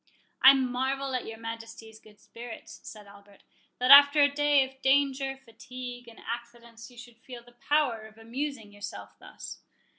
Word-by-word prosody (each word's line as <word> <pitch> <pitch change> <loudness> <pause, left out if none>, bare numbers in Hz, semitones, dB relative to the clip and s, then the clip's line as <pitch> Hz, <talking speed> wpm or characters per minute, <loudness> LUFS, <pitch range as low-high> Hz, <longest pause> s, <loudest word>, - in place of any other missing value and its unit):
"I 265 - +10
marvel 265 +1 -2
at 255 - -3
your 225 0 -8
Majesty's 225 -1 -9
good 210 -1 -20
spirits," 235 -1 -11
said 210 -1 -12
Albert, 200 0 -19 0.3
"that 250 +2 +2
after 285 +1 +9
a 285 0 +2
day 290 -1 +3
of 265 0 -20
danger, 270 0 +1
fatigue, 245 -1 -10
and 230 - -14
accidents, 235 0 -9
you 245 - -19
should 240 -1 -14
feel 245 0 -11
the 245 - -19
power 240 -3 -1
of 220 0 -20
amusing 235 -1 -6
yourself 205 0 -10
thus." - - -11
245 Hz, 160 wpm, -28 LUFS, 225-270 Hz, 0.3 s, I